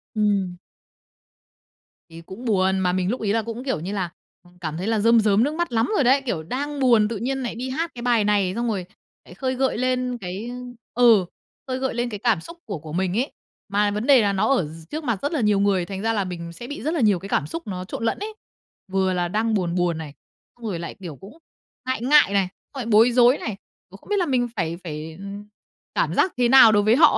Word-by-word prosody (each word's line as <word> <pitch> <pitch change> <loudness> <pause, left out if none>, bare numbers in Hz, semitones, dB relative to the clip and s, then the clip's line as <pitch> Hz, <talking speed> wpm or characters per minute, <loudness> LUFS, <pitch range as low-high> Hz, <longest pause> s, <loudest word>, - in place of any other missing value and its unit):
Ừm. 200 -4 +1 1.5
Thì 165 0 -11
cũng 190 +9 -10
buồn, 190 -3 +2
mà 180 -1 +1
mình 185 0 0
lúc 245 - -2
ấy 205 -2 0
là 225 - +2
cũng, 230 +3 -6
kiểu 265 - -1
như 180 +6 -5
là, 185 -4 -2 0.3
à, 175 - -20
cảm 155 -2 -4
thấy 190 +5 -3
là 225 -2 +1
rơm 230 +2 +5
rớm 210 0 +3
nước 295 +4 0
mắt 345 -3 -2
lắm 230 - +1
rồi 285 - +3
đấy! 270 +3 +4
Kiểu, 170 -10 -2
đang 280 - -4
buồn 235 -5 +4
tự 225 -1 -4
nhiên 265 +4 -2
nại 240 - -4
đi 255 +2 -4
hát 325 +6 -2
cái 240 - -7
bài 235 -3 +2
này, 200 -3 +2
xong 240 0 -1
rồi 195 -5 -2 0.4
lại - - -13
khơi 260 -1 -2
gợi 265 -3 0
lên 255 0 0
cái, 195 +6 -5 0.4
ơ 245 - +1
ừ, 220 -6 +6 0.4
khơi 255 0 -2
gợi 265 0 -1
lên 240 +1 -1
cái 210 - -6
cảm - - +3
xúc 335 - -11
của 200 -7 -5
của 155 0 -9
mình 185 +3 0
ấy. 260 +4 0 0.4
Mà 205 +1 +2
vấn 210 +3 -2
đề 270 -4 +7
là 200 -2 +1
nó 195 +3 +1
ở 190 - +1
d 160 +1 -11
trước 310 +1 -4
mặt 235 -8 -1
rất 285 - -1
là 290 - 0
nhiều 210 -2 +3
người, 195 -3 +2
thành 195 +1 -6
ra 225 +1 +1
là 205 -2 0
mình 170 -2 -6
sẽ 240 +8 -9
bị 290 -3 -6
rất 310 +4 -1
là 325 - 0
nhiều 205 -5 +3
cái 195 - -9
cảm - - 0
xúc 330 -6 -6
nó 185 -2 -4
trộn 190 - -6
lẫn - - 0
ấy. 430 +2 -5 0.6
Vừa 190 -1 +1
là 175 -1 0
đang 220 +4 0
buồn 180 -4 0
buồn 175 -2 +1
này, 155 -3 -7 0.4
xong 240 - -11
rồi 190 -6 -3
lại, 170 - -6
kiểu, 170 -5 -7
cũng 200 - -14 0.5
ngại 260 -3 -1
ngại 270 -4 +5
này, 195 -2 +2 0.3
xong 275 - -6
lại 245 - -3
bối 225 +2 +5
rối 245 +2 +5
này, 215 -3 -5 0.3
cũng 195 - -12
không 205 - -20
biết 415 - +2
là 360 - +2
mình 255 -5 +1
phải 170 -3 -2
phải, 160 -1 -6
ờ, 195 - -8 0.7
cảm - - +1
giác 375 - +2
thế 245 -1 +3
nào 260 -3 +9
đối 205 -1 +3
với 220 +3 +4
họ 310 +2 +6
215 Hz, 260 wpm, -23 LUFS, 185-250 Hz, 1.5 s, nào